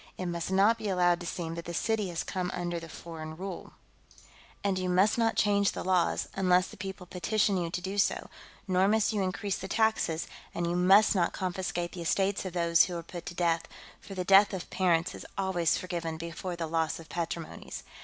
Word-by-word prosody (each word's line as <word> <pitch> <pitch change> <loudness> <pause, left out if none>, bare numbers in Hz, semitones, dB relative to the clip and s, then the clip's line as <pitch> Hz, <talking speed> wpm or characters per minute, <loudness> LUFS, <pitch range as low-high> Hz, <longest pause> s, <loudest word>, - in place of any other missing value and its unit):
It 185 - -4
must 170 -1 -3
not 200 +4 +4
be 215 -2 -3
allowed 175 -2 +3
to 175 - -6
seem 165 -2 -4
that 170 0 -6
the 170 - -5
city 220 0 0
has 170 -1 -3
come 180 -2 -3
under 175 -1 -2
foreign 160 -1 -8
rule. 190 0 -7 0.9
And 195 -2 +1
you 185 0 -1
must 190 +4 +4
not 230 -1 +2
change 200 -1 +3
the - - -4
laws, 185 -2 +1
unless 185 -1 +3
the - - -11
people 190 -1 -7
petition 200 +3 +1
you 175 -2 -1
to 180 +1 -3
do 195 +2 -3
so, - - +1 0.4
nor 185 0 +3
must 220 +1 +2
you 205 - 0
increase 190 +1 -1
the 190 - -5
taxes, 220 -7 +1 0.3
and 170 - -1
you 170 - 0
must 195 +5 +6
not 175 -4 +1
confiscate 180 -2 -2
the 175 - -7
estates 195 +4 +1
of 185 - -4
those 170 -1 +4
who 180 -2 -4
are 170 - -6
put 175 +1 -9
to 175 - -6
death, 165 -1 +1 0.3
for 195 - -10
the 180 -1 -2
death 195 +1 +6
of 180 - -7
parents 175 -2 +2
is - - -8
always 190 -4 +1
forgiven 170 -3 -4
before 170 +2 -5
the 170 -1 -3
loss 160 0 -1
of 165 - -11
patrimonies. 170 -1 -5
180 Hz, 210 wpm, -29 LUFS, 170-195 Hz, 0.9 s, must